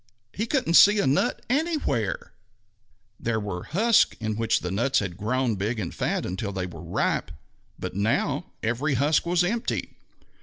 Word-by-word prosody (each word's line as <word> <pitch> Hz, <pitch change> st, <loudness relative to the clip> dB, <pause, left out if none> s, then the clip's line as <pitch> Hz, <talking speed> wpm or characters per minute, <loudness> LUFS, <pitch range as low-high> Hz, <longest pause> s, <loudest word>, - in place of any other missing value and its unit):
He 220 Hz, +3 st, -2 dB
couldn't 255 Hz, -, 0 dB
see 205 Hz, +4 st, +8 dB
a 200 Hz, -, +2 dB
nut 140 Hz, -, +1 dB
anywhere! 280 Hz, -, -1 dB, 0.9 s
There 115 Hz, -1 st, -1 dB
were 100 Hz, -4 st, -4 dB
the 165 Hz, -, -3 dB
husks 230 Hz, 0 st, +4 dB
in 110 Hz, -1 st, -2 dB
which 115 Hz, 0 st, +1 dB
the 90 Hz, -, -3 dB
nuts 120 Hz, +8 st, +1 dB
had 95 Hz, -4 st, -1 dB
grown 120 Hz, +5 st, 0 dB
big 110 Hz, +4 st, -2 dB
and 90 Hz, -5 st, -4 dB
fat -, -, -1 dB
until 100 Hz, +3 st, -3 dB
they 95 Hz, -2 st, -3 dB
were 85 Hz, -4 st, -9 dB
ripe, -, -, -1 dB, 0.5 s
but -, -, -5 dB
now 100 Hz, +3 st, 0 dB, 0.2 s
every 125 Hz, +6 st, 0 dB
husk 150 Hz, +5 st, +2 dB
was 175 Hz, 0 st, +3 dB
empty. 225 Hz, +6 st, -2 dB
120 Hz, 165 wpm, -25 LUFS, -, 0.9 s, see